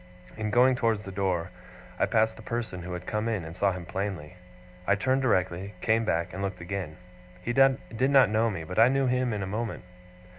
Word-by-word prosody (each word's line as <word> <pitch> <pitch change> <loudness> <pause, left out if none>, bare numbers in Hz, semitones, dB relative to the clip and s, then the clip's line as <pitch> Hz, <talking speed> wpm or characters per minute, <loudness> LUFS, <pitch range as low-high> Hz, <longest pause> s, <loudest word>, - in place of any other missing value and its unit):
In 110 -1 -3
going 125 +4 +5
towards 115 -4 0
the 95 - -7
door, 95 -2 -1 0.5
I - - +3
passed 110 0 +2
the - - -12
person 110 -5 -4
who 90 +1 -6
had 90 0 -6
come 105 +1 -2
in, 110 -7 -1
and 80 +1 -8
saw 100 +1 +2
him 90 -2 -6
plainly. 90 -3 -4 0.5
I - - +4
turned 130 +5 +1
directly, 95 -4 0
came 115 +2 +2
back, 85 -4 -1
and 95 - -5
looked 95 -2 -3
again. 85 -3 -5 0.5
He 120 - -1
did 135 -1 +2
not 135 -6 +5
know 110 +2 +2
me, 90 -6 -4
but 90 +6 -3
I 115 - +8
knew 135 +1 +2
him 125 -1 +1
in 105 -2 -2
a - - -2
moment. 105 +1 -4
105 Hz, 215 wpm, -28 LUFS, 90-115 Hz, 0.5 s, I